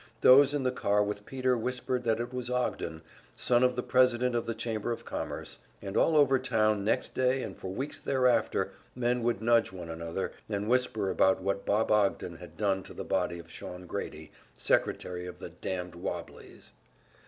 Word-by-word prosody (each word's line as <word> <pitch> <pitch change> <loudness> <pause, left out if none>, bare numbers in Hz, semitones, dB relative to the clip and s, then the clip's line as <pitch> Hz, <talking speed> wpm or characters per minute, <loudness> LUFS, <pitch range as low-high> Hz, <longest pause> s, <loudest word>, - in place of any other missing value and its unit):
Those 140 +2 +7
in 145 - 0
the 130 - +2
car 105 -4 +2
with 105 0 -4
Peter 130 -1 +1
whispered 125 +1 -2
that 115 -1 +2
it 120 +1 -4
was 125 -1 -3
Ogden, 85 -10 -2 0.3
son 120 -1 +3
of 125 0 +3
the 125 - -2
president 125 -1 +3
of 120 -1 -1
the 115 - -2
Chamber 110 0 -2
of 115 - -5
Commerce; - - -5 0.2
and 100 -1 -6
all 160 - +4
over 135 -3 +5
town 110 -5 +1
next 110 - 0
day 130 +1 +1
and - - -6
for - - -8
weeks 130 +10 -4
thereafter 130 -2 +2 0.2
men 125 0 +1
would 115 -3 0
nudge 115 -2 +4
one 90 -3 -8
another, 85 +3 -4 0.2
and 105 -1 -2
whisper 110 -5 +1
about 95 0 +3
what 100 0 -2
Bob 105 +2 +2
Ogden 100 -5 +1
had 90 0 -12
done 100 -2 +1
to - - -12
the - - -5
body 90 -2 0
of 85 - -11
Shawn 90 0 -8
Grady, - - -6 0.3
secretary 90 0 0
of 90 0 -8
the 90 - -8
"damned 90 +1 -5
wobblies." 85 - -7
110 Hz, 190 wpm, -30 LUFS, 95-125 Hz, 0.3 s, Those